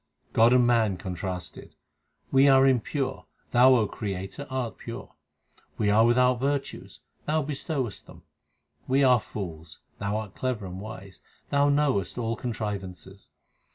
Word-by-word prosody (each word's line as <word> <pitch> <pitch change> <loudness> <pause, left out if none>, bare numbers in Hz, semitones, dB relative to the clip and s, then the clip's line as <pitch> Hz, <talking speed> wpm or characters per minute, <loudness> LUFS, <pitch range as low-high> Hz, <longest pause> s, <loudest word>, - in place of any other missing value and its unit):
God 115 +2 +5
and 125 -1 +5
man 115 -5 +2
contrasted: 90 -2 -6 0.6
We 135 +1 +5
are 135 -1 +6
impure; 130 +1 -1 0.2
Thou, 130 +1 +6
O 115 -3 +3
Creator, 95 +7 -5
art 125 -6 -4
pure; - - -8 0.6
we 105 -1 +2
are 110 +2 +5
without 125 0 +3
virtues; 140 +1 -3 0.3
Thou 155 0 +1
bestowest 135 - -4
them. - - -15 0.6
We 135 +2 +3
are 125 -2 +5
fools; 80 -7 -8 0.2
Thou 100 +1 -1
art 105 -3 -6
clever 125 -6 -3
and 95 +1 -7
wise; 100 -3 -10 0.3
Thou 140 0 +3
knowest 140 -10 +1
all 115 -1 -1
contrivances. 100 -5 -6
115 Hz, 135 wpm, -27 LUFS, 100-130 Hz, 0.6 s, are